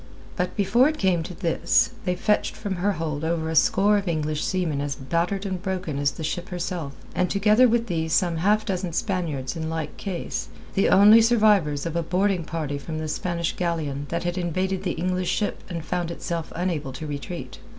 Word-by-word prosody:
But 180 Hz, 0 st, -2 dB
before 215 Hz, +6 st, +4 dB
it 310 Hz, -, -4 dB
came 185 Hz, -3 st, +2 dB
to 170 Hz, +2 st, -7 dB
this, 170 Hz, +2 st, +2 dB
they 180 Hz, -1 st, +1 dB
fetched 210 Hz, +3 st, +1 dB
from 200 Hz, -4 st, -4 dB
her 200 Hz, +3 st, +1 dB
hold 155 Hz, -3 st, -3 dB
over 160 Hz, -1 st, -1 dB
a -, -, -2 dB
score 205 Hz, +6 st, +4 dB
of 200 Hz, -, -7 dB
English 155 Hz, -2 st, -1 dB
seamen 170 Hz, -7 st, -1 dB
as 145 Hz, -1 st, -2 dB
battered 170 Hz, +8 st, -1 dB
and 185 Hz, -2 st, -3 dB
broken 185 Hz, -7 st, -3 dB
as 145 Hz, 0 st, +3 dB
the 160 Hz, -, -7 dB
ship 175 Hz, +5 st, -3 dB
herself, 175 Hz, -5 st, -4 dB, 0.2 s
and 180 Hz, -1 st, +1 dB
together 210 Hz, +5 st, +5 dB
with 235 Hz, 0 st, +2 dB
these 160 Hz, -5 st, -2 dB
some 170 Hz, -1 st, +2 dB
half 210 Hz, +6 st, +2 dB
dozen 185 Hz, -3 st, -2 dB
Spaniards 155 Hz, -10 st, -2 dB
in 160 Hz, -1 st, -3 dB
like 160 Hz, -2 st, -4 dB
case, 190 Hz, -4 st, -4 dB, 0.3 s
the 195 Hz, -, +3 dB
only 210 Hz, +3 st, +8 dB
survivors 210 Hz, -11 st, +3 dB
of 165 Hz, -1 st, -3 dB
a 170 Hz, -, +2 dB
boarding 185 Hz, +1 st, 0 dB
party 150 Hz, -4 st, -3 dB
from 155 Hz, +2 st, -5 dB
the 155 Hz, 0 st, -3 dB
Spanish 170 Hz, +1 st, -2 dB
galleon 155 Hz, -5 st, -2 dB
that 170 Hz, -, -2 dB
had 175 Hz, +1 st, -2 dB
invaded 185 Hz, +2 st, -1 dB
the -, -, -1 dB
English 180 Hz, +1 st, -1 dB
ship 205 Hz, +3 st, -1 dB
and 170 Hz, -3 st, -5 dB
found 175 Hz, 0 st, -2 dB
itself 170 Hz, -1 st, -4 dB
unable 165 Hz, -6 st, -2 dB
to 155 Hz, -, -6 dB
retreat. 150 Hz, +4 st, -6 dB
175 Hz, 200 wpm, -25 LUFS, 160-190 Hz, 0.3 s, only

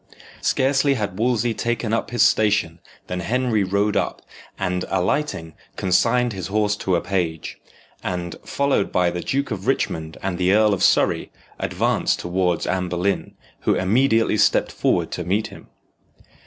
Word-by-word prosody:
Scarcely 135 Hz, +1 st, +2 dB
had 105 Hz, -5 st, -3 dB
Wolsey 120 Hz, -1 st, +1 dB
taken 115 Hz, -1 st, -2 dB
up 115 Hz, -, -1 dB
his 120 Hz, -, +2 dB
station 100 Hz, -6 st, +2 dB, 0.3 s
than 90 Hz, -, -4 dB
Henry 115 Hz, +2 st, 0 dB
rode 100 Hz, +2 st, 0 dB
up, -, -, -1 dB, 0.3 s
and, 90 Hz, -2 st, -1 dB
alighting, 90 Hz, -, -1 dB, 0.2 s
consigned 115 Hz, +6 st, +2 dB
his 95 Hz, -2 st, -5 dB
horse 105 Hz, +1 st, +1 dB
to 95 Hz, -3 st, 0 dB
a 85 Hz, -, +1 dB
page, 85 Hz, -5 st, -3 dB, 0.4 s
and, 90 Hz, -2 st, -3 dB
followed 140 Hz, -7 st, 0 dB
by 90 Hz, -1 st, +2 dB
the 90 Hz, 0 st, -4 dB
Duke 140 Hz, +7 st, -2 dB
of -, -, -4 dB
Richmond 80 Hz, -1 st, -1 dB
and 95 Hz, -2 st, -2 dB
the 90 Hz, +1 st, +3 dB
Earl 105 Hz, 0 st, +4 dB
of 95 Hz, -, -2 dB
Surrey, -, -, +2 dB, 0.3 s
advanced -, -, 0 dB
towards 90 Hz, -1 st, -1 dB
Anne 90 Hz, 0 st, -1 dB
Boleyn, 90 Hz, +3 st, -1 dB, 0.2 s
who -, -, +1 dB
immediately 115 Hz, +3 st, +2 dB
stepped -, -, +3 dB
forward -, -, 0 dB
to 90 Hz, -, -3 dB
meet 100 Hz, +5 st, 0 dB
him. -, -, -13 dB
100 Hz, 155 wpm, -22 LUFS, 90-115 Hz, 0.4 s, Earl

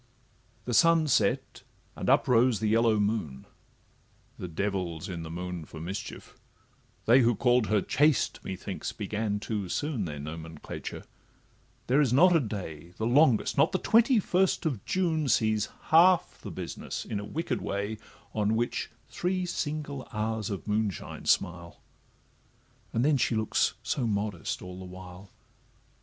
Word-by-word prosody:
The 125 Hz, -, -2 dB
sun 165 Hz, +5 st, +5 dB
set, 140 Hz, -, +1 dB, 0.3 s
and -, -, -3 dB
up -, -, +4 dB
rose 120 Hz, -2 st, +4 dB
the 110 Hz, -, 0 dB
yellow 110 Hz, 0 st, +3 dB
moon: 100 Hz, -11 st, -2 dB, 0.9 s
The 90 Hz, -, -4 dB
devil 90 Hz, -1 st, -2 dB
's 80 Hz, -, -7 dB
in 90 Hz, -3 st, -5 dB
the 80 Hz, -, -7 dB
moon 90 Hz, 0 st, -5 dB
for 80 Hz, +1 st, -10 dB
mischief; 90 Hz, +5 st, -7 dB, 0.7 s
they 120 Hz, +4 st, +6 dB
Who 120 Hz, -1 st, +3 dB
call'd 125 Hz, -1 st, +3 dB
her 105 Hz, -2 st, +2 dB
CHASTE, 145 Hz, 0 st, +2 dB
methinks, 95 Hz, +1 st, -5 dB
began 105 Hz, 0 st, -2 dB
too 105 Hz, -3 st, -3 dB
soon 145 Hz, -, -1 dB
Their 75 Hz, -3 st, -5 dB
nomenclature; 80 Hz, +1 st, -7 dB, 0.8 s
there 135 Hz, +4 st, +3 dB
is 135 Hz, -6 st, +2 dB
not 175 Hz, +7 st, +6 dB
a -, -, +6 dB
day, 90 Hz, -, -6 dB
The 110 Hz, -, -2 dB
longest, 125 Hz, -1 st, +3 dB
not -, -, +4 dB
the -, -, +3 dB
twenty 230 Hz, +5 st, +4 dB
first 185 Hz, -2 st, +1 dB
of 130 Hz, -11 st, -1 dB
June, 165 Hz, -5 st, 0 dB
Sees 110 Hz, -2 st, +2 dB, 0.2 s
half 175 Hz, +2 st, +5 dB
the -, -, -7 dB
business -, -, -6 dB
in 105 Hz, -, -3 dB
a -, -, -6 dB
wicked 160 Hz, +10 st, -3 dB
way 100 Hz, +2 st, -3 dB, 0.3 s
On 105 Hz, 0 st, +1 dB
which 120 Hz, +1 st, -1 dB, 0.2 s
three 185 Hz, +1 st, -1 dB
single 145 Hz, -5 st, -4 dB
hours 110 Hz, -1 st, -2 dB
of 100 Hz, 0 st, -5 dB
moonshine 105 Hz, -2 st, -2 dB
smile— 85 Hz, -2 st, 0 dB, 1.1 s
And 120 Hz, +3 st, +1 dB
then 150 Hz, -1 st, +4 dB
she 120 Hz, -, +1 dB
looks 110 Hz, -1 st, +1 dB
so 125 Hz, -4 st, -1 dB
modest 100 Hz, -5 st, -2 dB
all 90 Hz, 0 st, -8 dB
the -, -, -8 dB
while. 90 Hz, +1 st, -11 dB
110 Hz, 150 wpm, -28 LUFS, 95-140 Hz, 1.1 s, they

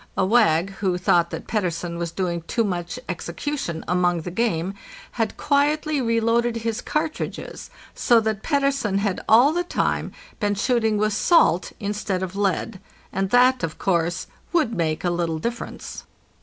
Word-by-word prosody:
A 195 Hz, -, +3 dB
wag, 195 Hz, -5 st, +3 dB
who 185 Hz, -3 st, 0 dB
thought 175 Hz, -1 st, +3 dB
that -, -, -6 dB
Pettersen 175 Hz, -4 st, -2 dB
was 170 Hz, -1 st, -2 dB
doing 170 Hz, -1 st, -2 dB
too 230 Hz, -, +1 dB
much 180 Hz, 0 st, -3 dB
execution 175 Hz, -, -4 dB
among 175 Hz, -1 st, +1 dB
the 175 Hz, -, -6 dB
game, 185 Hz, -3 st, 0 dB, 0.4 s
had 225 Hz, -3 st, -2 dB
quietly 295 Hz, +1 st, +1 dB
reloaded 230 Hz, 0 st, +1 dB
his 230 Hz, 0 st, -2 dB
cartridges, 310 Hz, +1 st, -4 dB, 0.2 s
so 235 Hz, -1 st, +4 dB
that 215 Hz, -1 st, -2 dB
Pettersen 275 Hz, -8 st, +1 dB
had 200 Hz, -2 st, -1 dB
all 245 Hz, +7 st, +6 dB
the 350 Hz, +1 st, 0 dB
time 350 Hz, -, -1 dB, 0.3 s
been 205 Hz, -2 st, +1 dB
shooting 220 Hz, 0 st, +1 dB
with 215 Hz, 0 st, +1 dB
salt 200 Hz, -, +3 dB
instead 200 Hz, -2 st, -2 dB
of 185 Hz, 0 st, -5 dB
lead, 200 Hz, +1 st, -1 dB, 0.3 s
and 195 Hz, 0 st, -1 dB
that, 250 Hz, +3 st, +4 dB
of 165 Hz, -2 st, -3 dB
course, 175 Hz, -2 st, 0 dB, 0.3 s
would 315 Hz, -10 st, +2 dB
make 160 Hz, -5 st, -1 dB
a 175 Hz, -, +1 dB
little 170 Hz, -2 st, -1 dB
difference. 235 Hz, +9 st, -5 dB
205 Hz, 155 wpm, -23 LUFS, 175-240 Hz, 0.4 s, all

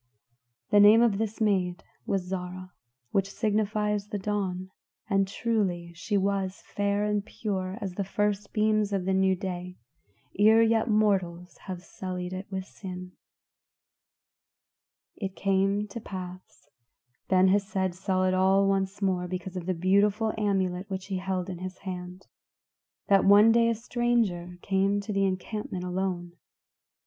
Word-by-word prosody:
The 205 Hz, -, +6 dB
name 210 Hz, +3 st, +8 dB
of 215 Hz, -4 st, +2 dB
this 220 Hz, -1 st, -2 dB
maid 190 Hz, -5 st, +1 dB, 0.2 s
was 195 Hz, -2 st, 0 dB
Zarah, 185 Hz, 0 st, -6 dB, 0.4 s
which 195 Hz, 0 st, +1 dB
signifies 210 Hz, -1 st, 0 dB
the 210 Hz, -, -3 dB
Dawn; 190 Hz, -2 st, -3 dB, 0.4 s
and 195 Hz, -2 st, +2 dB
truly 190 Hz, -6 st, -1 dB
she 200 Hz, +4 st, -1 dB
was 195 Hz, -1 st, -1 dB
fair 205 Hz, 0 st, 0 dB
and 210 Hz, -1 st, 0 dB
pure 195 Hz, -3 st, -4 dB
as 195 Hz, -3 st, -4 dB
the 200 Hz, -, -2 dB
first 205 Hz, +1 st, -1 dB
beams 215 Hz, -1 st, +2 dB
of 195 Hz, -3 st, -1 dB
the 190 Hz, -, +1 dB
new 190 Hz, 0 st, +3 dB
day, 180 Hz, -1 st, -5 dB, 0.6 s
ere 220 Hz, +2 st, +6 dB
yet 225 Hz, +1 st, +2 dB
mortals 190 Hz, -5 st, +1 dB
have 180 Hz, -2 st, -5 dB
sullied 180 Hz, -1 st, -5 dB
it 185 Hz, +1 st, -6 dB
with 190 Hz, -1 st, -4 dB
sin. 185 Hz, -2 st, -8 dB, 2.1 s
It 195 Hz, -2 st, -4 dB
came 195 Hz, +1 st, +1 dB
to 235 Hz, -, -6 dB
pass 185 Hz, -6 st, -9 dB, 0.6 s
Ben 185 Hz, 0 st, +4 dB
Hesed 195 Hz, -2 st, +1 dB
saw 185 Hz, +1 st, -1 dB
it 185 Hz, 0 st, +2 dB
all 190 Hz, +1 st, +4 dB
once 195 Hz, +1 st, 0 dB
more 180 Hz, -2 st, 0 dB
because 185 Hz, +1 st, -5 dB
of 180 Hz, -1 st, -5 dB
the 185 Hz, -, 0 dB
wonderful 205 Hz, +4 st, +2 dB
amulet 195 Hz, -3 st, -1 dB
which 190 Hz, -1 st, -4 dB
he 190 Hz, -1 st, -3 dB
held 185 Hz, -1 st, -2 dB
in 180 Hz, -2 st, -6 dB
his 185 Hz, 0 st, -6 dB
hand 180 Hz, 0 st, -7 dB, 0.8 s
that 195 Hz, -1 st, +5 dB
one 205 Hz, +3 st, +7 dB
day 230 Hz, 0 st, +4 dB
a 230 Hz, -, +1 dB
stranger 225 Hz, -7 st, -1 dB
came 195 Hz, +1 st, +1 dB
to 210 Hz, +1 st, -5 dB
the 195 Hz, 0 st, +2 dB
encampment 190 Hz, 0 st, -3 dB
alone. 180 Hz, -1 st, -2 dB
195 Hz, 145 wpm, -28 LUFS, 185-205 Hz, 2.1 s, name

